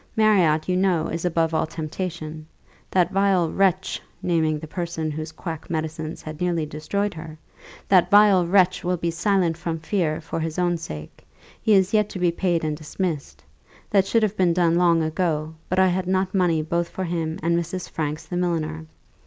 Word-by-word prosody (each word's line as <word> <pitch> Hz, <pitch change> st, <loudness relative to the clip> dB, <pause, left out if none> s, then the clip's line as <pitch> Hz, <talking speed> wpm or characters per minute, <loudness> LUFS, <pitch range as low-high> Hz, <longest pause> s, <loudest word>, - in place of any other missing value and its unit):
Marriott, 185 Hz, -8 st, +3 dB
you 180 Hz, -, +1 dB
know, 180 Hz, -4 st, +1 dB
is 165 Hz, +1 st, -3 dB
above 165 Hz, -2 st, +1 dB
all 160 Hz, 0 st, +1 dB
temptation. 155 Hz, -1 st, -5 dB, 0.4 s
That 180 Hz, -1 st, +2 dB
vile 195 Hz, -4 st, +2 dB
wretch 190 Hz, -1 st, +1 dB, 0.2 s
(naming 160 Hz, -3 st, +1 dB
the 155 Hz, -, -7 dB
person 165 Hz, -1 st, -3 dB
whose 155 Hz, +1 st, -5 dB
quack 160 Hz, -1 st, -7 dB
medicines 160 Hz, 0 st, -4 dB
had 155 Hz, +1 st, -8 dB
nearly 170 Hz, -3 st, 0 dB
destroyed 195 Hz, +7 st, -2 dB
her), 160 Hz, -1 st, -9 dB, 0.5 s
that 185 Hz, -3 st, +4 dB
vile 200 Hz, -4 st, +6 dB
wretch 185 Hz, 0 st, +3 dB
will 180 Hz, 0 st, 0 dB
be 170 Hz, 0 st, -1 dB
silent 175 Hz, -1 st, +1 dB
from 165 Hz, -1 st, -3 dB
fear, 160 Hz, -1 st, -1 dB
for 160 Hz, -, -5 dB
his 160 Hz, -1 st, -3 dB
own 175 Hz, -1 st, +1 dB
sake. 75 Hz, -, -9 dB, 0.4 s
He 220 Hz, -, +3 dB
is 190 Hz, 0 st, +3 dB
yet 210 Hz, -1 st, +3 dB
to -, -, -6 dB
be 175 Hz, -1 st, +2 dB
paid 170 Hz, -1 st, 0 dB
and 155 Hz, -1 st, -1 dB
dismissed. 155 Hz, 0 st, -4 dB, 0.5 s
That 195 Hz, -2 st, +3 dB
should 230 Hz, -1 st, +2 dB
have 215 Hz, -1 st, 0 dB
been 180 Hz, -3 st, +3 dB
done 170 Hz, -1 st, +3 dB
long 170 Hz, -1 st, +3 dB
ago, 160 Hz, -1 st, -1 dB, 0.2 s
but 185 Hz, -, -1 dB
I 190 Hz, 0 st, +5 dB
had 180 Hz, 0 st, -1 dB
not 185 Hz, 0 st, 0 dB
money 175 Hz, -5 st, +2 dB
both 170 Hz, +2 st, -1 dB
for 190 Hz, -, -4 dB
him 165 Hz, -2 st, -2 dB
and 170 Hz, +1 st, +2 dB
Mrs. 170 Hz, +2 st, -3 dB
Franks 155 Hz, 0 st, -4 dB
the 175 Hz, -, -4 dB
milliner. 160 Hz, -, -2 dB
170 Hz, 185 wpm, -23 LUFS, 160-185 Hz, 0.5 s, vile